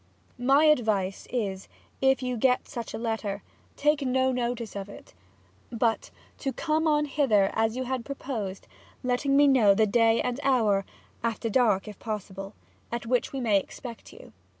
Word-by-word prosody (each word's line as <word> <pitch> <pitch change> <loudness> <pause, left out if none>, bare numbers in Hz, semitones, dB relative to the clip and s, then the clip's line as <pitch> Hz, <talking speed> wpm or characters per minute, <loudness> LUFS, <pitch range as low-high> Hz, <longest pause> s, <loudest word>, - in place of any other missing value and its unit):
My 270 +4 +4
Advice 215 -10 +1
is, 200 -6 -3 0.3
if 265 -1 +3
you 250 0 -1
get 250 +2 +2
such 235 -5 -6
a - - -3
Letter, 220 -3 -3 0.3
to - - -15
take 295 0 +3
no 260 0 +2
Notice 240 -3 -3
of 200 0 -5
it, - - -13 0.6
but 230 -1 0 0.3
to 270 - -2
come 315 +4 0
on 300 -1 +3
hither 245 -10 +2
as 225 +1 +1
you 260 - -1
had 255 -1 -3
proposed, 230 -9 -5 0.4
letting 255 +3 +1
me 290 0 +6
know 225 -8 +5
the 220 - +4
Day 225 +2 +3
and 250 +1 -1
Hour 220 -8 +2 0.4
(after 230 0 -2
dark, 210 -6 +2
if 210 -2 -9
possible) 195 -2 -6 0.4
at 235 0 -3
which 245 +1 0
we 270 - -4
may 215 -5 +3
expect 235 +4 -10
you. - - -14
235 Hz, 170 wpm, -27 LUFS, 210-265 Hz, 0.6 s, me